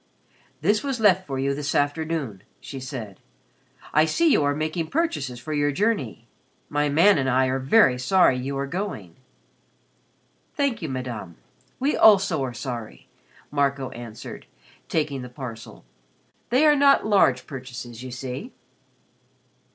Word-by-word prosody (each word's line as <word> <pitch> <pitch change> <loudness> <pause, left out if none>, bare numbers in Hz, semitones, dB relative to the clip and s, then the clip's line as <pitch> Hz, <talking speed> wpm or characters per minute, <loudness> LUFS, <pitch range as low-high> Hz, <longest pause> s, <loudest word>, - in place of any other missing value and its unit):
"This 205 +7 +2
was 270 -4 -2
left 190 -3 +3
for 135 -2 -3
you 135 +1 0
this 145 +1 -3
afternoon," 145 - -1 0.2
she 135 - -8
said. 125 -7 -7 0.7
"I 155 +1 +5
see 325 - +2
you 150 - +4
are 145 0 +1
making 155 +2 -2
purchases 150 - -2
for 155 +6 -6
your 145 -1 +1
journey. 150 - -1 0.4
My 145 0 0
man 165 +4 +5
and 130 -1 0
I 130 +1 +3
are 130 +1 0
very 130 - +4
sorry 175 +1 +4
you 135 +2 -3
are 140 - -1
going." 140 - -5 1.4
"Thank 280 -7 0
you, 160 - -4
Madame. 125 -9 -5 0.4
We 275 +3 +1
also 195 -8 +5
are 130 - -3
sorry," 120 -5 -7 0.4
Marco 140 -2 0
answered, 115 -2 -9 0.4
taking 150 -4 -1
the 125 - -8
parcel. 120 - -9 0.6
"They 260 +6 +4
are 300 -1 +6
not 280 -1 +4
large 190 -12 +3
purchases, 125 -3 -8
you 130 - -7
see." 130 - -6
140 Hz, 145 wpm, -24 LUFS, 125-185 Hz, 1.4 s, are